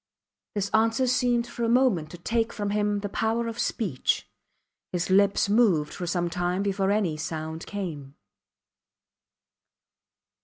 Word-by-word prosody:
This 200 Hz, -1 st, -1 dB
answer 225 Hz, +4 st, +3 dB
seemed 245 Hz, -2 st, +2 dB
for 240 Hz, -, -5 dB
a 230 Hz, -, +1 dB
moment 235 Hz, -11 st, +3 dB
to 175 Hz, -, -9 dB
take 225 Hz, +6 st, 0 dB
from 205 Hz, -1 st, -3 dB
him 205 Hz, 0 st, 0 dB
the 205 Hz, -, -2 dB
power 225 Hz, +3 st, 0 dB
of 230 Hz, 0 st, -5 dB
speech. 175 Hz, -, -1 dB, 0.6 s
His 180 Hz, +1 st, -2 dB
lips 200 Hz, +2 st, +4 dB
moved 200 Hz, -9 st, +3 dB
for 175 Hz, -, -5 dB
some 175 Hz, 0 st, 0 dB
time 180 Hz, +2 st, -1 dB
before 195 Hz, -1 st, 0 dB
any 200 Hz, -7 st, +1 dB
sound 160 Hz, +1 st, -5 dB
came. 155 Hz, -9 st, -6 dB
200 Hz, 140 wpm, -26 LUFS, 175-225 Hz, 0.6 s, lips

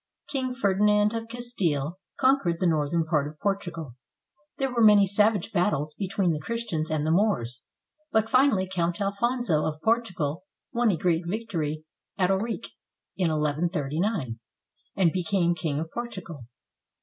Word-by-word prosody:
King 260 Hz, -3 st, -2 dB
Ferdinand 210 Hz, -1 st, +3 dB
of 230 Hz, 0 st, -4 dB
Castile 185 Hz, -, -2 dB, 0.2 s
conquered 260 Hz, -11 st, +3 dB
the 185 Hz, -, +1 dB
northern 160 Hz, 0 st, +1 dB
part 150 Hz, -3 st, +1 dB
of 150 Hz, +1 st, -10 dB
Portugal. 170 Hz, -, -3 dB, 0.6 s
There 270 Hz, -2 st, -1 dB
were 235 Hz, -, +1 dB
many 210 Hz, -2 st, +7 dB
savage 205 Hz, +1 st, +2 dB
battles 165 Hz, -6 st, 0 dB
between 195 Hz, 0 st, 0 dB
the 150 Hz, -, -3 dB
Christians 170 Hz, -4 st, -3 dB
and 155 Hz, -1 st, 0 dB
the 160 Hz, -, +1 dB
Moors, 165 Hz, -, +1 dB, 0.5 s
but 220 Hz, 0 st, +2 dB
finally 225 Hz, -6 st, +3 dB
Count 175 Hz, -2 st, -1 dB
Alfonso 200 Hz, -4 st, 0 dB
of 155 Hz, -1 st, -2 dB
Portugal 185 Hz, -9 st, 0 dB, 0.3 s
won 240 Hz, -1 st, +2 dB
a 185 Hz, -, +1 dB
great 170 Hz, 0 st, +1 dB
victory 165 Hz, -7 st, -3 dB, 0.3 s
at 185 Hz, 0 st, +2 dB
Ourique 215 Hz, +4 st, -2 dB, 0.5 s
in 185 Hz, -3 st, +1 dB
1139, 155 Hz, -, -1 dB, 0.6 s
and 180 Hz, -4 st, +3 dB
be 185 Hz, +1 st, -1 dB
came 175 Hz, -1 st, +2 dB
King 155 Hz, -3 st, -2 dB
of 160 Hz, +1 st, -5 dB
Portugal. 185 Hz, -, -6 dB
185 Hz, 145 wpm, -26 LUFS, 155-215 Hz, 0.6 s, many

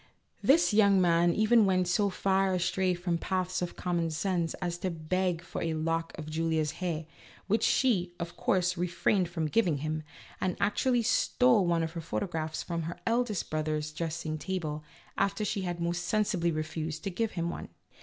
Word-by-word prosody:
This 305 Hz, -3 st, +4 dB
young 200 Hz, -2 st, +5 dB
man 175 Hz, -1 st, +4 dB
even 220 Hz, +4 st, +4 dB
went 185 Hz, -1 st, +2 dB
so 200 Hz, +3 st, +2 dB
far 190 Hz, 0 st, +1 dB
astray 185 Hz, +1 st, +1 dB
from 175 Hz, -1 st, -1 dB
paths 185 Hz, 0 st, -1 dB
of 175 Hz, -, -3 dB
common 170 Hz, -2 st, -1 dB
sense 170 Hz, +1 st, -1 dB
as 175 Hz, -2 st, -3 dB
to 185 Hz, -, -1 dB
beg 175 Hz, +1 st, -1 dB
for -, -, -6 dB
a 165 Hz, -1 st, -1 dB
lock 165 Hz, +1 st, -2 dB
of 155 Hz, -2 st, -7 dB
Julia's 160 Hz, -1 st, 0 dB
hair, 165 Hz, -3 st, -2 dB, 0.4 s
which 215 Hz, +3 st, +1 dB
she, 185 Hz, -9 st, +2 dB
of 170 Hz, 0 st, -5 dB
course, 180 Hz, -1 st, +1 dB
refrained 180 Hz, +1 st, +1 dB
from 165 Hz, -2 st, -2 dB
giv 220 Hz, +7 st, +2 dB
ing 155 Hz, -4 st, +1 dB
him, 155 Hz, +2 st, -2 dB, 0.4 s
and 185 Hz, -1 st, 0 dB
actually 240 Hz, +4 st, +2 dB
stole 235 Hz, -3 st, +3 dB
one 170 Hz, -1 st, +2 dB
of 160 Hz, -, -3 dB
her 165 Hz, 0 st, -5 dB
photographs 160 Hz, -2 st, -3 dB
from 170 Hz, -1 st, -3 dB
her 175 Hz, -, -7 dB
eldest 230 Hz, -4 st, 0 dB
brother's 155 Hz, 0 st, -1 dB
dressing 155 Hz, -1 st, -3 dB
table, 155 Hz, -4 st, -3 dB, 0.4 s
after 200 Hz, +2 st, +1 dB
she 205 Hz, 0 st, -1 dB
had 175 Hz, -2 st, -3 dB
most 170 Hz, +1 st, -1 dB
sensibly 195 Hz, -4 st, +1 dB
refused 155 Hz, 0 st, -4 dB
to 195 Hz, -, -2 dB
give 225 Hz, +4 st, -1 dB
him 170 Hz, -1 st, -1 dB
one. -, -, -7 dB
175 Hz, 180 wpm, -30 LUFS, 165-195 Hz, 0.4 s, young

